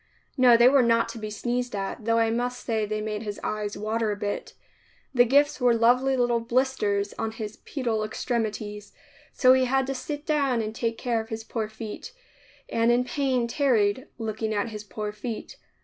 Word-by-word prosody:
No, 250 Hz, -3 st, +6 dB
they 235 Hz, +1 st, +7 dB
were 275 Hz, +1 st, +6 dB
not 230 Hz, -1 st, +3 dB
to 230 Hz, 0 st, -7 dB
be 215 Hz, 0 st, -5 dB
sneezed 245 Hz, +2 st, -2 dB
at, 200 Hz, +3 st, -4 dB
though 230 Hz, 0 st, +2 dB
I 225 Hz, -1 st, +3 dB
must 245 Hz, +2 st, -2 dB
say 220 Hz, -3 st, 0 dB
they 215 Hz, 0 st, -2 dB
made 210 Hz, -1 st, -3 dB
his 210 Hz, -2 st, -5 dB
eyes 210 Hz, -1 st, -3 dB
water 215 Hz, +2 st, -1 dB
a -, -, -1 dB
bit. 205 Hz, 0 st, -4 dB, 0.6 s
The 245 Hz, -2 st, +6 dB
gifts 285 Hz, +3 st, +3 dB
were 245 Hz, -1 st, +4 dB
lovely 250 Hz, +3 st, +3 dB
little 240 Hz, -1 st, +2 dB
blisters 230 Hz, -4 st, 0 dB
on 225 Hz, -, -1 dB
his 220 Hz, -1 st, -6 dB
pedal 235 Hz, -6 st, -2 dB
extremities, 215 Hz, -2 st, -3 dB, 0.4 s
so 255 Hz, 0 st, +5 dB
he 260 Hz, 0 st, +3 dB
had 265 Hz, +1 st, +1 dB
to 270 Hz, -, -2 dB
sit 290 Hz, +3 st, -5 dB
down 280 Hz, -6 st, +1 dB
and 220 Hz, -1 st, -3 dB
take 230 Hz, 0 st, -2 dB
care 235 Hz, -2 st, 0 dB
of 220 Hz, -, -12 dB
his 225 Hz, 0 st, -5 dB
poor 220 Hz, -1 st, -3 dB
feet 220 Hz, -, -8 dB, 0.5 s
and 230 Hz, +1 st, +2 dB
in 245 Hz, +1 st, +3 dB
pain 255 Hz, -3 st, 0 dB
tarried, 240 Hz, -2 st, +1 dB
looking 220 Hz, -1 st, -3 dB
at 205 Hz, +3 st, -1 dB
his 210 Hz, -1 st, -7 dB
poor 210 Hz, 0 st, -5 dB
feet. 220 Hz, +1 st, -6 dB
230 Hz, 195 wpm, -26 LUFS, 215-250 Hz, 0.6 s, they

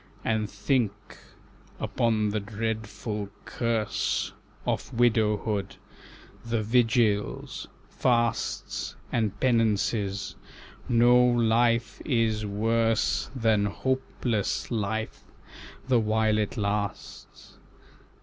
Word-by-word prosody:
"And 110 Hz, -2 st, 0 dB
think 115 Hz, -8 st, -1 dB, 0.6 s
upon 110 Hz, -3 st, +1 dB
the 105 Hz, +1 st, -1 dB
dreadful 110 Hz, 0 st, -4 dB, 0.2 s
curse 115 Hz, -3 st, -1 dB, 0.3 s
Of -, -, -2 dB
widowhood; 110 Hz, -3 st, +1 dB, 0.7 s
the 115 Hz, -1 st, -1 dB
vigils, 115 Hz, -2 st, +1 dB, 0.2 s
fasts, 120 Hz, -2 st, -1 dB, 0.2 s
And 105 Hz, -4 st, 0 dB
penances; 105 Hz, -4 st, +1 dB, 0.5 s
no 120 Hz, +1 st, +6 dB
life 120 Hz, -1 st, +2 dB
is 110 Hz, -5 st, +1 dB
worse 110 Hz, -3 st, +1 dB
Than 110 Hz, -4 st, +2 dB
hopeless 125 Hz, -2 st, -2 dB
life, 110 Hz, 0 st, -2 dB, 0.7 s
the 125 Hz, -2 st, +4 dB
while 110 Hz, 0 st, +2 dB
it 105 Hz, -, -2 dB
lasts. 100 Hz, -1 st, -4 dB
110 Hz, 80 wpm, -27 LUFS, 105-115 Hz, 0.7 s, no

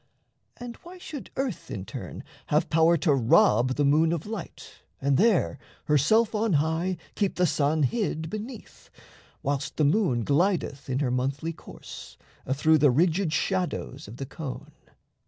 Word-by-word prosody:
And 240 Hz, -1 st, -8 dB
why 355 Hz, +2 st, -12 dB
should 310 Hz, -6 st, -8 dB
earth 260 Hz, -, -3 dB
in 95 Hz, -1 st, -5 dB
turn -, -, -7 dB, 0.2 s
Have 155 Hz, +2 st, +1 dB
power 165 Hz, +1 st, +4 dB
to 150 Hz, -1 st, +2 dB
rob 125 Hz, 0 st, +4 dB
the 145 Hz, -, +1 dB
moon 155 Hz, +3 st, +4 dB
of 170 Hz, -2 st, -2 dB
light, 220 Hz, 0 st, -8 dB, 0.2 s
and 140 Hz, 0 st, +1 dB
there, 210 Hz, -, +2 dB, 0.3 s
Herself 185 Hz, -, +3 dB
on 215 Hz, -2 st, +1 dB
high, 160 Hz, +5 st, +1 dB, 0.2 s
keep 200 Hz, -3 st, -1 dB
the 180 Hz, -, +2 dB
sun 150 Hz, -1 st, +1 dB
hid 160 Hz, -, -1 dB
beneath, 215 Hz, +6 st, -8 dB, 0.5 s
Whilst 140 Hz, +1 st, -2 dB
the 155 Hz, -, +3 dB
moon 140 Hz, -, +2 dB
glideth 150 Hz, -3 st, 0 dB
in 130 Hz, -, 0 dB
her 130 Hz, -4 st, 0 dB
monthly 135 Hz, +6 st, -1 dB
course -, -, -11 dB, 0.3 s
Athrough 155 Hz, +4 st, +3 dB
the 145 Hz, 0 st, +5 dB
rigid 165 Hz, +5 st, +2 dB
shadows 175 Hz, -5 st, -2 dB
of 110 Hz, +4 st, -10 dB
the 135 Hz, -, -5 dB
cone? 140 Hz, -1 st, -7 dB
160 Hz, 155 wpm, -26 LUFS, 140-195 Hz, 0.5 s, the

